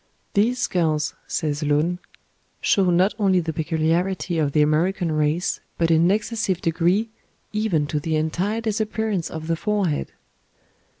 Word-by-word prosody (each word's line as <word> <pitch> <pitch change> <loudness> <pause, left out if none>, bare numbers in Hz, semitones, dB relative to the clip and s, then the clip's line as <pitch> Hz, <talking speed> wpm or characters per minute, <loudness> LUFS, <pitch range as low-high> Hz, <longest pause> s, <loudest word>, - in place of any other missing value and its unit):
"These 225 +5 +2
skulls," 155 -9 0
says 150 -2 -2
Lund, 150 +4 +1 0.6
"show 190 -3 +3
not 180 +4 +3
only 190 -3 +3
the 160 -2 -3
peculiarity 165 +2 0
of 145 -2 +1
the 150 +1 +4
American 165 +3 +1
race 155 +3 0 0.2
but 165 -1 +2
in 160 0 +5
an - - +4
excessive 210 -2 0
degree, 180 +7 +1 0.4
even 210 -8 +1
to 150 0 -2
the 160 +1 -1
entire 180 +8 -1
disappearance 220 -4 -1
of 160 -1 -6
the 165 +1 0
forehead." 195 -4 -1
170 Hz, 140 wpm, -23 LUFS, 155-200 Hz, 0.6 s, in